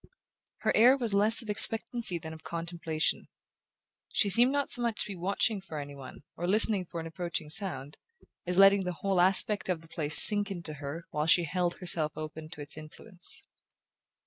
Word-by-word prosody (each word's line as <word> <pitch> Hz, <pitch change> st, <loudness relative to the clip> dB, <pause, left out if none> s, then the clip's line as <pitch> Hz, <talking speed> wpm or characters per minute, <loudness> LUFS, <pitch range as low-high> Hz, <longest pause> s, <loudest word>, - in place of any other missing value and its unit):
Her -, -, -2 dB
air 250 Hz, +5 st, +4 dB
was 235 Hz, -6 st, -5 dB
less 215 Hz, +4 st, +1 dB
of 220 Hz, -, -14 dB
expectancy 220 Hz, -2 st, +2 dB
than 160 Hz, -1 st, -11 dB
of 160 Hz, 0 st, -15 dB
contemplation: 165 Hz, -2 st, -5 dB, 0.8 s
she 200 Hz, -, 0 dB
seemed 240 Hz, +6 st, +4 dB
not 285 Hz, 0 st, -3 dB
so 245 Hz, -, +1 dB
much 235 Hz, -2 st, -3 dB
to -, -, -2 dB
be 200 Hz, -, -9 dB
watching 195 Hz, +3 st, -2 dB
for 165 Hz, -5 st, -11 dB
any 145 Hz, -1 st, -9 dB
one, 135 Hz, 0 st, -14 dB
or 175 Hz, -, -6 dB
listening 210 Hz, -1 st, 0 dB
for 170 Hz, -, -9 dB
an 165 Hz, -, -8 dB
approaching 165 Hz, -2 st, -7 dB
sound, 165 Hz, -6 st, 0 dB, 0.5 s
as 180 Hz, 0 st, -4 dB
letting 195 Hz, 0 st, +4 dB
the 180 Hz, -1 st, -5 dB
whole 190 Hz, -2 st, 0 dB
aspect 190 Hz, +2 st, +4 dB
of 175 Hz, -3 st, -3 dB
the 165 Hz, -, -19 dB
place 155 Hz, -1 st, +3 dB
sink 205 Hz, -1 st, +9 dB
into 170 Hz, -5 st, -8 dB
her 145 Hz, +3 st, -9 dB
while 150 Hz, +1 st, -4 dB
she 175 Hz, +1 st, +2 dB
held 175 Hz, +2 st, -4 dB
herself 165 Hz, -4 st, 0 dB
open 155 Hz, 0 st, -10 dB
to 165 Hz, -3 st, -12 dB
its 145 Hz, +1 st, -5 dB
influence. 175 Hz, +5 st, -12 dB
175 Hz, 190 wpm, -27 LUFS, 160-205 Hz, 0.8 s, sink